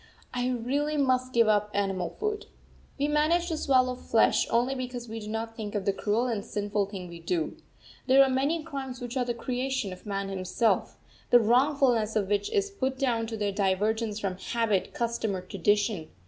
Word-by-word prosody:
I 250 0 0
really 275 +5 -1
must 255 -2 +2
give 230 -2 +4
up 210 -1 +2
animal 195 -3 0
food. 425 0 -2 0.5
We 285 +1 +1
manage 315 +4 +2
to 320 - -1
swallow 255 -3 +3
flesh 230 -2 +2
only 240 +3 +2
because 250 -2 -5
we 225 0 -5
do 210 - -8
not 225 +1 -4
think 215 -2 -6
of 200 -2 -1
the 200 - +2
cruel 215 +5 0
and 225 -5 -2
sinful 205 -1 -1
thing 190 -3 -7
we 170 -1 -10
do. 165 -1 -2 0.5
There 270 +1 +7
are - - +3
many 285 +5 +1
crimes 270 -5 -6
which 245 +1 -6
are 255 -2 +1
the 240 -1 -2
creation 255 -3 -2
of 185 - -13
man 195 -1 -2
himself, 195 +4 0 0.3
the 245 - +7
wrongfulness 245 -2 +3
of 200 -3 0
which 205 -1 +1
is 400 0 0
put 265 -8 -2
down 235 -4 0
to 225 0 -5
their 205 -1 0
divergence 210 +2 0
from 190 -3 -3
habit, 225 -5 0
custom, 230 -3 -1
or 185 - -4
tradition. 200 -2 0
230 Hz, 190 wpm, -28 LUFS, 205-260 Hz, 0.5 s, There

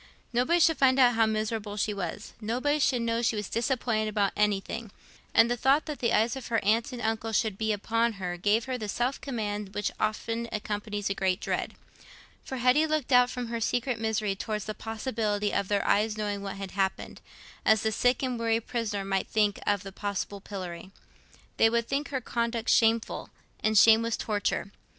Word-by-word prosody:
Nobody 255 +9 +3
should 325 -3 +4
find 260 -1 +5
out 250 -2 +6
how 225 -1 +3
miserable 215 -1 -2
she 210 +1 0
was, 200 +2 -5
nobody 255 +7 0
should 255 -4 +2
know 230 0 0
she 230 -1 +1
was 210 -2 -3
disappointed 230 -2 0
about 205 -2 0
anything; 210 +2 -1 0.4
and 230 - +6
the 240 - 0
thought 270 +5 +3
that 300 -2 -5
the 235 -2 +1
eyes 225 +3 +2
of 265 - -7
her 230 - +1
aunt 225 +5 +2
and 245 -2 -6
uncle 225 0 -1
would 215 -3 -3
be 220 +2 -1
upon 230 +3 0
her 180 -3 -4
gave 205 +5 +1
her 255 -1 -3
the 215 -2 -4
self 245 +6 -1
command 210 -6 -4
which 205 - -1
often 230 +2 -2
accompanies 205 -1 -3
a - - +2
great 190 -2 0
dread. - - -3 0.7
For 265 - -5
Hetty 255 +6 +4
looked 310 -4 -1
out 250 0 +6
from 245 -2 -5
her 230 0 -3
secret 245 +1 0
misery 220 -2 0
towards 210 0 -4
the 215 - -4
possibility 215 -2 -2
of 200 -1 0
their 200 0 0
ever 215 +2 +3
knowing 205 -1 -2
what 195 -1 -5
had 195 -1 -6
happened, 195 -1 -2 0.4
as 220 -1 +4
the 220 - +1
sick 245 +4 +1
and 250 -2 -1
weary 225 0 +2
prisoner 220 -4 -3
might 195 -1 -1
think 210 -2 +1
of 205 -1 +1
the 195 - -8
possible 200 0 -4
pillory. 185 -3 -7 0.7
They 225 - +5
would 235 0 0
think 280 +1 -2
her 270 -2 -2
conduct 235 -1 -2
shameful, 225 0 +2 0.3
and 215 0 +1
shame 225 +2 +7
was 230 0 -1
torture. 205 -2 -1
220 Hz, 195 wpm, -28 LUFS, 205-240 Hz, 0.7 s, shame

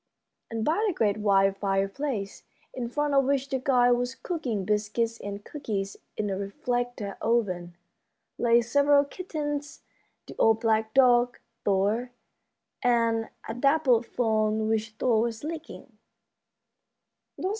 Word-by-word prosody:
And 225 -1 -3
by 340 +8 +1
the 380 - -1
great 210 -2 +1
wide 195 -2 +3
fireplace, 195 +3 -2 0.3
in 240 -2 -4
front 295 +3 -1
of 275 0 +5
which 275 0 0
the 265 -1 -1
guide 250 -2 +3
was 245 +1 0
cooking 245 - -3
biscuits 215 +3 -1
and 200 0 -7
cookies 205 -9 -4 0.2
in 210 -1 -1
a 190 - -2
reflector 245 -1 -3
oven, 185 -7 0 0.6
lay 235 0 +4
several 285 +4 +4
kittens, 295 -3 -5 0.4
the - - -11
old 225 0 +4
black 220 -1 +1
dog, 245 -2 +5 0.3
Thor, 205 +5 +1 0.7
and 230 -2 +2 0.2
a - - -3
dappled 255 -2 +3
fawn 220 -2 +1
which 220 0 0
Thor 230 -3 +2
was 230 0 -3
licking. 305 -7 -8
235 Hz, 125 wpm, -27 LUFS, 215-270 Hz, 0.7 s, of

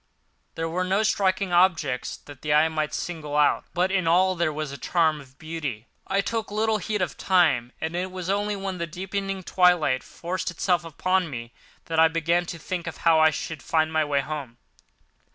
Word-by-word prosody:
There 165 0 -2
were 175 +3 -1
no 190 +4 +1
striking 190 -3 +1
objects 170 -8 +2
that 145 -2 -14
the 150 -1 +1
eye 155 +2 +5
might 155 -1 -2
single 155 -4 -4
out; 150 -1 +3
but 180 +2 +2
in 185 -3 +1
all 185 +3 +4
there 170 -3 0
was 155 -1 -4
a 140 - -7
charm 160 -4 +1
of 130 0 -18
beauty. 150 -8 -5 0.2
I 195 +1 +2
took 225 +1 -3
little 215 +1 +1
heed 210 -1 -1
of 180 - -4
time 155 -11 +3
and 160 +1 -3
it 180 +1 -2
was 185 -1 -6
only 205 +2 0
when 195 -2 -4
the 170 - -2
deepening 195 +3 -4
twilight 175 -8 +3
forced 185 +2 -4
itself 180 -1 0
upon 180 +2 0
me 115 -3 -7 0.3
that 160 -1 -1
I 160 - +8
began 165 +2 0
to 170 - -5
think 175 +1 -5
of - - -5
how 165 -1 +6
I 155 0 +6
should 155 -1 -5
find 160 0 +1
my 160 0 +3
way 145 -2 +1
home. 140 -5 -6
170 Hz, 200 wpm, -25 LUFS, 155-185 Hz, 0.3 s, I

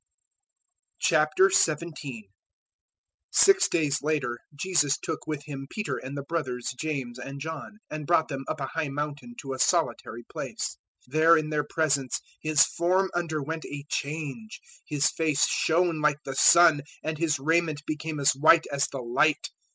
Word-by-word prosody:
017:001 155 - +2 1.1
Six 390 -1 +5
day 155 -4 +1
later, 140 -5 -1 0.2
Jesus 145 -3 +1
took 160 -2 -5
with 150 -2 -4
Him 135 -2 -7
Peter 210 -1 -3
and 135 +2 -7
the 140 - -4
brothers 135 -6 -3
James 135 -6 -4
and 135 +2 -7
John, 160 +7 -7
and 155 -2 -6
brought 165 -2 +3
them 135 -2 -5
up 155 - -3
a 135 - -2
high 160 +3 -3
mountain 150 - -5
to 135 -2 -5
a 130 - -7
solitary - - 0
place. - - -5 0.3
017:002 125 - -21
There 160 +2 +6
in 155 -1 -2
their 150 -1 0
presence 140 -5 0 0.2
His 155 -2 +4
form 185 +3 0
underwent 160 -2 -3
a 145 0 -7
change; 155 +9 -4 0.3
His 150 -1 +2
face 155 -3 +2
shone 165 -1 +1
like 150 -1 +2
the 135 - -4
sun, 165 0 +6 0.2
and 155 -1 -3
His 160 -3 +1
raiment 155 +1 0
became 155 0 -4
as 140 0 +4
white 160 +4 +5
as 140 0 +1
the 135 - -6
light. 125 +6 +1
155 Hz, 155 wpm, -27 LUFS, 140-160 Hz, 1.1 s, There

